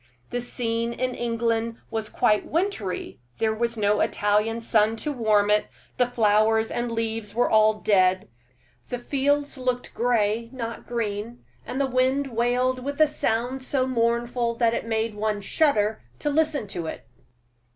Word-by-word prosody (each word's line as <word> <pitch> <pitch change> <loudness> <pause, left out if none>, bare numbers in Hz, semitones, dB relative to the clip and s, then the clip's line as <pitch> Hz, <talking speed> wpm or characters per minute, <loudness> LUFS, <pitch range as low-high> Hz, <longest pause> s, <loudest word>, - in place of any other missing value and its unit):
The 245 - -1
scene 235 -1 -2
in 255 +1 -2
England 230 -1 -1
was 220 -1 -3
quite 215 -4 +2
wintry; 325 - -2 0.2
there 220 -1 +1
was 235 +1 -1
no 205 0 +2
Italian 210 +2 +1
sun 220 -1 +2
to 295 +6 -3
warm 210 -4 +2
it; 210 0 +2 0.3
the 250 - +3
flowers 220 -1 +2
and 240 0 -2
leaves 225 -2 -3
were 245 - +3
all 215 0 +4
dead; 185 -3 +2 0.6
the 245 - -2
fields 285 +2 0
looked 250 -1 -2
gray, 230 -1 +1
not 230 -3 -6
green, 230 0 -4 0.2
and 260 - -3
the 280 - +3
wind 260 0 0
wailed 250 +2 +1
with 280 +2 -4
a 310 - +8
sound 255 -2 -1
so 260 0 0
mournful 235 -1 0
that 230 -1 +2
it 230 - -3
made 225 0 -1
one 210 0 -1
shudder 215 -2 +1 0.2
to 295 - -1
listen 305 -4 +1
to 170 -4 -4
it. - - -7
230 Hz, 155 wpm, -25 LUFS, 215-250 Hz, 0.6 s, a